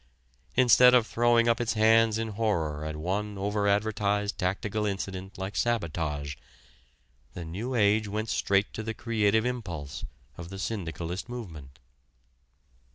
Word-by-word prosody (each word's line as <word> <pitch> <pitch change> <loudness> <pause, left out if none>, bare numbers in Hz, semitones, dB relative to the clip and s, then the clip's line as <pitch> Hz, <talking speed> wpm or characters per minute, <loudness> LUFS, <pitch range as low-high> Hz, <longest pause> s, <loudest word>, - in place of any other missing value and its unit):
Instead 125 0 +7
of 120 -3 +4
throwing 120 +1 +3
up 115 0 +2
its 120 - 0
hands 110 0 +4
in 115 0 -2
horror 85 -9 -1
at 75 0 -4
one 100 +6 -3
over 100 +1 0
advertised 105 0 +1
tactical 100 +3 -1
incident 95 -1 -4
like 95 +2 -5
sabotage, 80 - -1 1.0
the 85 - -6
"New 110 +11 -4
Age" 105 -1 +3
went 110 +2 -3
straight 100 +1 +1
to - - -4
the 110 0 -4
creative 110 -1 +1
impulse 90 - -4 0.4
of 85 0 -7
the 95 - -7
syndicalist 90 -1 -4
movement. 80 - -8
105 Hz, 135 wpm, -28 LUFS, 90-115 Hz, 1.0 s, Instead